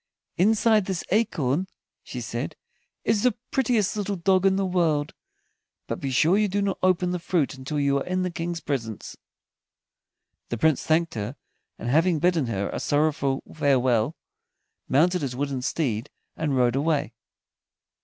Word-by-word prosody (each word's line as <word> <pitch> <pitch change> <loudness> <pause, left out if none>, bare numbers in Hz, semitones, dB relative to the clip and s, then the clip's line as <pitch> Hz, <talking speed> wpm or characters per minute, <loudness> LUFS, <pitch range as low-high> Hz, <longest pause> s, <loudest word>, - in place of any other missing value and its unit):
"Inside 215 +2 +3
this 185 -3 -3
acorn," 185 - +1 0.3
she - - -7
said, - - -4 0.5
"is 215 -2 +2
the 250 +1 +2 0.2
prettiest 235 -7 +1
little 205 -1 -2
dog 190 +1 +3
in 190 - +3
the 195 0 0
world. 165 -5 +1 0.7
But - - -4
be 135 - -3
sure 160 +9 +3
you 210 - +3
do 200 +1 -1
not 200 -1 -1
open 185 -1 +2
the 180 - -2
fruit 170 -4 0
until 135 +3 -4
you 140 -1 +2
are - - -3
in 185 0 -1
the 180 - -2
King's 170 0 -4
presence." 115 -7 -4 1.3
The 120 - -2
Prince 155 +3 +3
thanked 165 +1 +1
her, 110 +4 -4 0.4
and 115 - -6
having 160 +6 +3
bidden 165 -4 +2
her 100 -3 -2
a - - -3
sorrowful 145 -2 +1
farewell, 130 -3 +2 0.7
mounted 175 +6 +3
his 130 -3 -3
wooden 135 -1 -2
steed 125 -5 -1 0.3
and 150 -4 -1
rode 125 -1 +3
away. 145 -3 0
160 Hz, 155 wpm, -25 LUFS, 135-185 Hz, 1.3 s, Inside